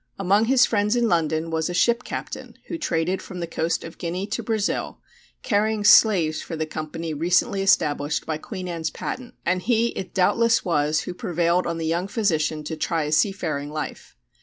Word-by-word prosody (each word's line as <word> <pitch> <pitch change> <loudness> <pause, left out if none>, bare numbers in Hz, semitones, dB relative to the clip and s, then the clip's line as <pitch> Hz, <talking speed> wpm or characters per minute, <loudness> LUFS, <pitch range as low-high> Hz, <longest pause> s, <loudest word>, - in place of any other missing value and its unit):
Among 195 +3 +3
his 250 +1 +5
friends 210 +1 +1
in 240 -1 +2
London 165 -2 0
was 160 +1 -1
a 175 - -3
ship 235 +5 +2
captain - - -7
who 335 - -4
traded 185 - -1
from 185 - -8
the 170 - -2
coast 165 0 -2
of 165 - -10
Guinea 180 +3 -3
to 215 - -3
Brazil, 220 -3 -2 0.5
carrying 215 -1 +1
slaves 190 -7 +5
for 165 - -6
the 155 0 -2
company 155 +1 -5
recently 175 +5 +1
established 150 -6 +1
by 155 -1 -3
Queen 185 +1 -6
Anne's 165 -2 -3
patent, 255 -1 -6
and 185 +1 +1
he 235 +2 +2
it 185 -4 -7
doubtless 230 +5 +3
was 150 -3 +1
who - - -6
prevailed 175 0 0
on 170 -1 -2
the 165 - -3
young 170 +4 0
physician 160 -9 0
to 160 +2 -4
try 160 0 -1
a 150 - -3
seafaring 155 -4 0
life. 150 - -6
175 Hz, 185 wpm, -24 LUFS, 160-205 Hz, 0.5 s, his